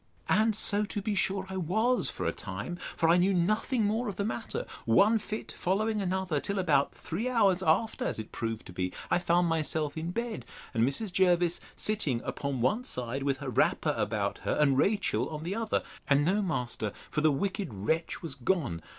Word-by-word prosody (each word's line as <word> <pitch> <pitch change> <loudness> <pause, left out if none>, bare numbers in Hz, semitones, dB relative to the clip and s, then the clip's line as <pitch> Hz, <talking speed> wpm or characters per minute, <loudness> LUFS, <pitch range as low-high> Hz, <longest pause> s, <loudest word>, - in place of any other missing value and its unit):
And 220 0 +3
so, 205 -1 +1
to 210 - -3
be 210 +1 -1
sure, 195 -1 +1
I 190 0 -5
was 220 +9 +1
for - - -4
a - - +2
time; 175 - -5 0.2
for 165 - +3
I 170 +2 +6
knew 185 +2 +3
nothing 215 +6 +1
more 220 +3 0
of 200 - -5
the 200 - -1
matter, 225 0 -3 0.2
one 205 - +5
fit 215 +1 -5
following 210 +3 0
another, 185 -4 0
till 200 +7 -2
about 150 -7 +3
three 215 +10 -3
hours 200 -7 +3
after, 185 +6 +1
as - - -2
it 110 - -7
proved 115 -1 -4
to 90 - -10
be, 90 0 -2 0.2
I - - +4
found 175 0 +2
myself 155 -2 -1
in 160 +1 -3
bed, 230 - -3 0.3
and 115 - +2
Mrs. 180 - 0
Jervis 175 -2 +3
sitting 180 - 0
upon 140 -3 -3
one 170 - +2
side, 125 - -4
with 135 -1 0
her 135 0 -5
wrapper - - +2
about - - -1
her, - - -1
and 140 -3 +4
Rachel 135 - +1
on 155 0 -5
the 175 +4 -2
other; 225 0 0 0.3
and 145 +1 +4
no 195 +5 +2
master, 125 - -2 0.2
for 150 - 0
the 155 0 +5
wicked 190 - -2
wretch 110 - -2
was 160 -5 -4
gone. 135 - -1
175 Hz, 200 wpm, -30 LUFS, 140-205 Hz, 0.3 s, I